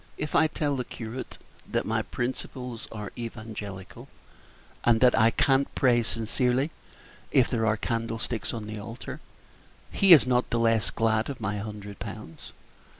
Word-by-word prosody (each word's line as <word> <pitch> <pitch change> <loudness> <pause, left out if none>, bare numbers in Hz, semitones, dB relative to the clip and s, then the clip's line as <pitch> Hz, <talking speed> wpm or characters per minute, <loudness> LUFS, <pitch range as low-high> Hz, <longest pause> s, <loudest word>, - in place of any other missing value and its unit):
If 150 - -4
I 160 - +6
tell 150 -2 -1
the 125 - -1
curate 120 +1 -7 0.3
that - - 0
my - - +1
principles 125 0 -4
are 105 -2 -6
evangelical, 110 -5 -7
Page - - -28 0.7
38 - - +4
and 115 - +3
that 125 -1 +6
I 110 +1 +6
can't 135 +3 +2
pray 120 -2 +4
sincerely 125 +5 0 0.6
if 130 - +5
there 115 -2 +1
are 110 0 +2
candlesticks 115 0 -2
on 110 -2 -5
the 110 0 -6
altar, 120 +6 -7 0.7
he 195 -2 +4
is 155 -7 +10
not 125 -1 +1
the 120 - 0
less 115 -2 +3
glad 110 0 +1
of 140 - -5
my 105 -2 -2
hundred 105 -1 -7
pounds. 105 -7 -8
115 Hz, 160 wpm, -27 LUFS, 110-130 Hz, 0.7 s, is